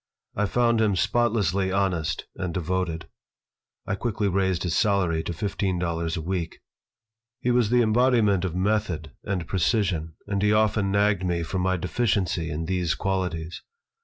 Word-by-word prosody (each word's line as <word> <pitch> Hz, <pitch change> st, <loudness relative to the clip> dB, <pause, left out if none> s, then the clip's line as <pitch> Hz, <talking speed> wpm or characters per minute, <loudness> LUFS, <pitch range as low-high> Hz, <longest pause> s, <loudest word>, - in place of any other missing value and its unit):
I 105 Hz, 0 st, +1 dB
found 115 Hz, +2 st, +2 dB
him 105 Hz, -3 st, +2 dB
spotlessly 100 Hz, -4 st, +1 dB
honest 95 Hz, -4 st, 0 dB
and 90 Hz, -3 st, -4 dB
devoted 90 Hz, -1 st, -2 dB, 0.8 s
I -, -, -2 dB
quickly 105 Hz, 0 st, -1 dB
raised 95 Hz, -2 st, +1 dB
his 85 Hz, -3 st, -1 dB
salary 100 Hz, -8 st, +2 dB
to 85 Hz, -, -4 dB
fifteen 95 Hz, +1 st, -2 dB
dollars 85 Hz, -1 st, -2 dB
a 80 Hz, -, -4 dB
week 85 Hz, -1 st, -3 dB, 0.8 s
He 125 Hz, -, 0 dB
was 120 Hz, -3 st, +3 dB
the 120 Hz, 0 st, +4 dB
embodiment 110 Hz, -4 st, +3 dB
of 90 Hz, -3 st, -2 dB
method 95 Hz, -6 st, -1 dB
and 95 Hz, -5 st, -2 dB
precision 90 Hz, -3 st, 0 dB
and 100 Hz, -1 st, -2 dB
he 105 Hz, 0 st, +3 dB
often 105 Hz, -2 st, +2 dB
nagged 100 Hz, -1 st, +2 dB
me 85 Hz, -2 st, 0 dB
for 95 Hz, +3 st, -3 dB
my 95 Hz, 0 st, +1 dB
deficiency 90 Hz, -2 st, 0 dB
in 75 Hz, +2 st, -3 dB
these 90 Hz, -2 st, 0 dB
qualities. 90 Hz, -4 st, -2 dB
95 Hz, 155 wpm, -25 LUFS, 85-105 Hz, 0.8 s, the